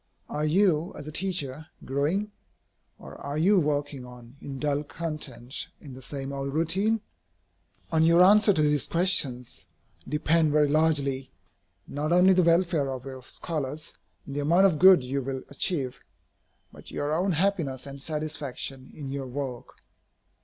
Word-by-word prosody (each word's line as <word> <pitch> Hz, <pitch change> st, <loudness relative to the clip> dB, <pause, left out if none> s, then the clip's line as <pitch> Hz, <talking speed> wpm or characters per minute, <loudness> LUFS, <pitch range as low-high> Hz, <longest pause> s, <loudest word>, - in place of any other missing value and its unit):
Are 150 Hz, +1 st, -1 dB
you, 180 Hz, 0 st, +2 dB
as -, -, -8 dB
a 155 Hz, -, -7 dB
teacher, 160 Hz, -4 st, -3 dB, 0.2 s
growing? 155 Hz, +11 st, -1 dB, 0.7 s
or -, -, -12 dB
are 140 Hz, +1 st, -4 dB
you 190 Hz, +5 st, +4 dB
working 145 Hz, -3 st, -2 dB
on 125 Hz, 0 st, -13 dB
in 135 Hz, -1 st, -7 dB
dull 145 Hz, +1 st, -1 dB
content 145 Hz, -5 st, -4 dB
in 140 Hz, -4 st, -11 dB
the 130 Hz, -, -11 dB
same 135 Hz, +1 st, -6 dB
old 140 Hz, 0 st, -4 dB
routine? 195 Hz, +7 st, +1 dB, 0.9 s
On 160 Hz, -, +2 dB
your 170 Hz, +2 st, +6 dB
answer 210 Hz, +2 st, +6 dB
to 155 Hz, -6 st, +2 dB
these 150 Hz, -1 st, +2 dB
questions 160 Hz, -9 st, +1 dB, 0.5 s
depend 155 Hz, +1 st, +2 dB
very 150 Hz, -1 st, +4 dB
largely, 140 Hz, -3 st, +1 dB, 0.6 s
not 150 Hz, +3 st, -3 dB
only 180 Hz, +2 st, +6 dB
the 185 Hz, -, +4 dB
welfare 170 Hz, -4 st, +2 dB
of 130 Hz, -1 st, -6 dB
your 130 Hz, -1 st, -8 dB
scholars 150 Hz, +2 st, -5 dB, 0.3 s
and 140 Hz, -, -7 dB
the -, -, -1 dB
amount 170 Hz, +7 st, +4 dB
of 165 Hz, -6 st, +2 dB
good 185 Hz, -5 st, +7 dB
you 135 Hz, +2 st, -2 dB
will 135 Hz, 0 st, -5 dB
achieve, 140 Hz, -3 st, -2 dB, 0.7 s
but -, -, -13 dB
your 145 Hz, +1 st, -2 dB
own 180 Hz, +3 st, +1 dB
happiness 160 Hz, -7 st, -1 dB
and 140 Hz, 0 st, -9 dB
satisfaction 145 Hz, -4 st, -4 dB
in 145 Hz, -3 st, -7 dB
your 135 Hz, -1 st, -4 dB
work. 125 Hz, -2 st, -7 dB
150 Hz, 155 wpm, -27 LUFS, 135-170 Hz, 0.9 s, good